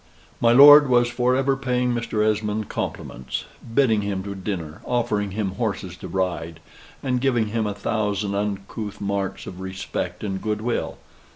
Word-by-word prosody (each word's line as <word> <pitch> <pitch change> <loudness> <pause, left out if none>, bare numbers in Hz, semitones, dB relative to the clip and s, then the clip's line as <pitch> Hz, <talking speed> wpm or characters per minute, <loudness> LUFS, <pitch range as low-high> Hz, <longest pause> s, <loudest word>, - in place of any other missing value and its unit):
My 115 - +4
lord 145 +3 +9
was 120 -1 +4
for 125 +1 +1
ever 135 +1 +2
paying 125 -2 0
Mr. 115 -2 -1
Esmond 105 0 -1
compliments: 65 +1 -4 0.3
bidding 115 -4 +3
him 100 -2 -3
to 100 0 -5
dinner, 90 -5 -5
offering 115 -5 0
him 100 0 -2
horses 100 -3 -3
to 95 - -8
ride, 85 -3 -2 0.4
and 125 -2 0
giving 120 -5 +1
him 110 0 -1
a 100 - -3
thousand 105 -2 -1
uncouth 100 +1 -4
marks 100 -1 -3
of 90 - -8
respect 95 +3 -5
and 95 -2 -3
good 105 -1 -2
will. 120 +1 -2
105 Hz, 160 wpm, -23 LUFS, 100-120 Hz, 0.4 s, lord